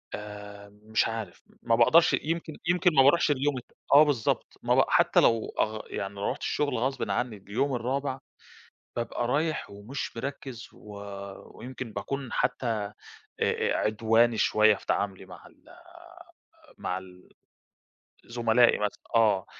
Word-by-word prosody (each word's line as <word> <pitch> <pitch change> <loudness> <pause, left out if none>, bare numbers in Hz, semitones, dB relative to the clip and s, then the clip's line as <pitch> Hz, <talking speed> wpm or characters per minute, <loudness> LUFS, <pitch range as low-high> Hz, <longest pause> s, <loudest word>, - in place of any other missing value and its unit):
آآ، 105 -1 -9
مش 110 +1 +1
عارِف، 110 -5 -6 0.2
ما 115 - +2
باقدَرش، 160 +9 +5
يمكن 165 0 -2
يمكن 180 0 +3
ما 135 - +7
بارُوحش 150 +2 +4
اليوم 140 0 0
الت 125 - -10 0.2
آه 145 +2 +9
بالضبط، 140 -7 -1
ما - - +2
ب - - +5
حتى - - +4
لو 115 -1 +2
أغ 110 0 0
يعني 100 0 -5
رُحت 100 - -2
الشغل 145 -5 -1
غصبًا 130 +3 -1
عنِّي 125 -4 -2
اليوم 120 +8 -2
الرابع، 130 +2 -2 0.8
بابقى 120 0 -2
رايِح 155 -2 -1
ومش 115 +6 -6
مركِّز، 130 -2 -6
و 105 - -15 0.7
ويمكن 125 -1 -7
باكون 135 +6 -5
حتى 125 - 0
أ 105 -3 -2 0.5
أ - - +1
عدواني 115 +2 +2
شويَّة 110 0 +4
في - - -15
تعاملي 100 -2 -2
مع - - -13
ال - - -21 1.1
مع 90 - -3
ال 90 -1 -13 1.0
زملائي 120 0 +3
مثل 105 -1 -2 0.2
آه، 105 -4 +3
115 Hz, 140 wpm, -27 LUFS, 105-135 Hz, 1.1 s, آه